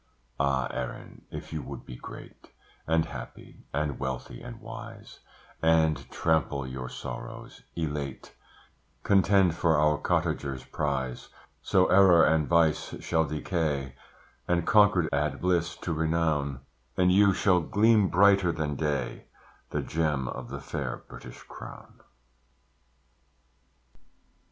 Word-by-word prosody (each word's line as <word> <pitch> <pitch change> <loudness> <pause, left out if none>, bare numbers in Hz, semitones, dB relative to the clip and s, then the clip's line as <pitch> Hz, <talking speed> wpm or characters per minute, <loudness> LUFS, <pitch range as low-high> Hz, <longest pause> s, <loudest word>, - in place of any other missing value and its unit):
Ah! 70 -2 +1
Erin, - - -7
if - - -8
you 80 - -3
would - - -8
be 60 - -9
great, - - -11 0.4
And 80 0 +2
happy, - - -10
and 75 0 -2
wealthy, 65 -2 -5
and - - -9
wise, - - -10 0.4
And 80 -1 +2
trample 75 -4 0
your 65 -1 -6
sorrows, 60 0 -8
elate, 75 -5 -4 0.7
Contend 95 -2 +4
for 80 -2 +2
our 75 0 +3
cottager's 65 -2 -1
prize; 65 -4 -3 0.3
So 95 -1 +3
error 95 -4 +6
and 80 -2 +2
vice 85 -3 +2
shall 80 0 +1
decay, 75 -3 -2 0.5
And 85 -1 +1
concord 105 -6 +5
add 70 0 0
bliss 85 -2 0
to 85 - -4
renown, 80 -4 0 0.4
And 90 0 +4
you 100 +2 +6
shall 95 -1 +3
gleam 105 +3 +3
brighter 100 -1 +5
than 75 -3 -2
day, 75 0 -2 0.4
The - - -2
gem 75 -5 -1
of 60 0 -6
the - - -6
fair - - -5
British - - -11
Crown. - - -11
80 Hz, 120 wpm, -28 LUFS, 70-90 Hz, 0.7 s, error